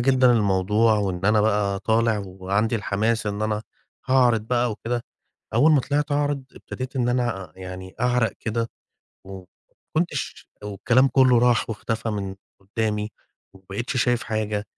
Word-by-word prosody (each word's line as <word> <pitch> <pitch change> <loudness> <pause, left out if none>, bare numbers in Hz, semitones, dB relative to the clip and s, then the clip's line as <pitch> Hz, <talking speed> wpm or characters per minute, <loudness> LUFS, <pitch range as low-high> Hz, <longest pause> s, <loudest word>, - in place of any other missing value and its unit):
جدًا 130 +1 +4
للموضوع، 105 +1 +3
وإن 95 -2 -2
أنا 105 +1 +4
بقى 105 -2 +1
طالع 110 +1 +2
وعندي 100 +5 -1
الحماس 110 +3 0
إن 105 +1 -2
أنا 110 0 -1 0.4
هاعرِض 125 -3 +4
بقى 120 +2 0
وكده. 120 +2 -3 0.5
أول 155 +2 +5
ما 145 - +5
طلِعت 145 +2 -1
أعرض 145 -2 0
ابتديت 130 +1 -7
إن 120 -1 +1
أنا 120 -9 -1
يعني 95 0 -8
أعرق 125 -2 +2
كده، 115 +1 -2 0.6
وما 95 -1 -10 0.5
كنتش 170 +2 -2 0.2
والكلام 115 +6 +2
كلّه 130 -1 +5
راح 120 -1 +3
واختفى 115 +1 -3
من 100 -2 -3 0.3
قدامي، 105 +1 -2 0.4
وما 95 - -18
بقيتش 120 +7 -3
شايف 125 -1 +2
حاجة، 110 -2 -2
110 Hz, 140 wpm, -24 LUFS, 100-125 Hz, 0.6 s, أول